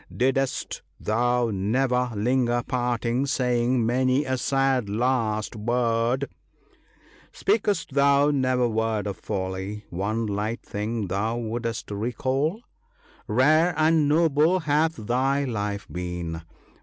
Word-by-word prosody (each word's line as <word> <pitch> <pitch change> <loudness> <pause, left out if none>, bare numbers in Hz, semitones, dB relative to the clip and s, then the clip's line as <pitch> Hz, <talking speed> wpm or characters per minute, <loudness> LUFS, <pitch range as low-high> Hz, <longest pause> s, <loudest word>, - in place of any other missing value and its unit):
Didst 135 +1 0 0.2
thou 120 +2 +1
never 125 +5 +1
linger 120 +2 +1
parting, 120 +1 0
saying 125 -3 +1
many 130 +4 +2
a 130 -1 0
sad 135 -3 +1
last 110 -1 0
word? 120 +3 0 1.0
Spak'st 205 -6 0
thou 140 +1 +4
never 130 -3 +2
word 110 -2 -1
of 100 -2 -4
folly, 95 +1 -4
one 105 +6 -1
light 105 +2 -3
thing 105 +1 -3
thou 100 +5 -1
would'st 115 -1 -4
recall? 130 - -1 0.7
Rare 155 +9 +3
and 155 -1 +3
noble 160 +3 +3
hath 155 +2 +1
thy 130 +5 0
life 105 -5 -3
been 90 -2 -5
120 Hz, 105 wpm, -25 LUFS, 110-135 Hz, 1.0 s, thou